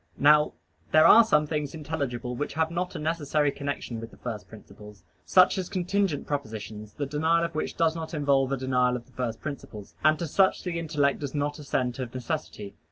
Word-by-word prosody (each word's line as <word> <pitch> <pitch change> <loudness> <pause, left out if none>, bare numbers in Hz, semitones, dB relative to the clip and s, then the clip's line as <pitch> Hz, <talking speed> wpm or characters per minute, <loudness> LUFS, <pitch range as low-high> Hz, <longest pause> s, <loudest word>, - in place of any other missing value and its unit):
Now 150 +1 +5 0.4
there 155 +1 +6
are 230 +7 +9
some 150 -9 +3
things 150 -1 -3
intelligible 140 -6 -4
which 145 +2 -4
have 160 0 +1
not 180 +1 -3
a - - -2
necessary 150 -2 0
connection 140 -5 -4
with 115 0 -7
the - - -17
first 110 -4 -6
principles; 105 -1 -14 0.2
such 185 +1 +5
as 185 - -4
contingent 185 -3 0
propositions, 110 -6 -5
the 145 - -3
denial 160 +4 +1
of - - -5
which 155 - -3
does 165 -1 +2
not 165 0 -5
involve 140 -2 +2
a 135 - 0
denial 125 -1 +1
of 120 -1 -6
the 130 - -24
first 120 -2 -4
principles. 120 -8 -7
And 155 +1 +5
to 170 - -3
such 190 +5 +2
the 175 -2 -2
intellect 145 -4 0
does 145 -1 -5
not 145 +1 -2
assent 130 -3 -2
of 125 -1 -5
necessity. 125 -7 -5
145 Hz, 200 wpm, -27 LUFS, 125-160 Hz, 0.4 s, are